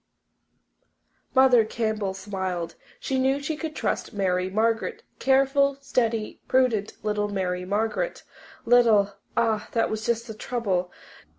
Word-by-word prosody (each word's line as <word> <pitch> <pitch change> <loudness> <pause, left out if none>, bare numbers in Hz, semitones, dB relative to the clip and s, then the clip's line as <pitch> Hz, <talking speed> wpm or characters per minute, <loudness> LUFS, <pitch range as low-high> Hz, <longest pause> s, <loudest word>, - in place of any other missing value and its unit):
Mother 260 -3 +6
Campbell 215 -3 -2
smiled. 190 -3 -4 0.3
She 265 -1 -1
knew 265 +2 +2
she 285 +2 -3
could 310 0 -5
trust - - -2
Mary 185 -2 0
Margaret 225 +3 0 0.2
careful, 275 +1 +3
steady, 230 -5 -1
prudent 240 -5 +2
little 210 -1 0
Mary 180 -3 -2
Margaret. 220 - -1 0.4
Little! 225 -4 +5 0.2
Ah, 220 -2 +1
that 230 - +1
was 220 0 -3
just 235 0 0
the 225 - -7
trouble. 205 -6 -2
220 Hz, 120 wpm, -25 LUFS, 200-255 Hz, 0.4 s, Mother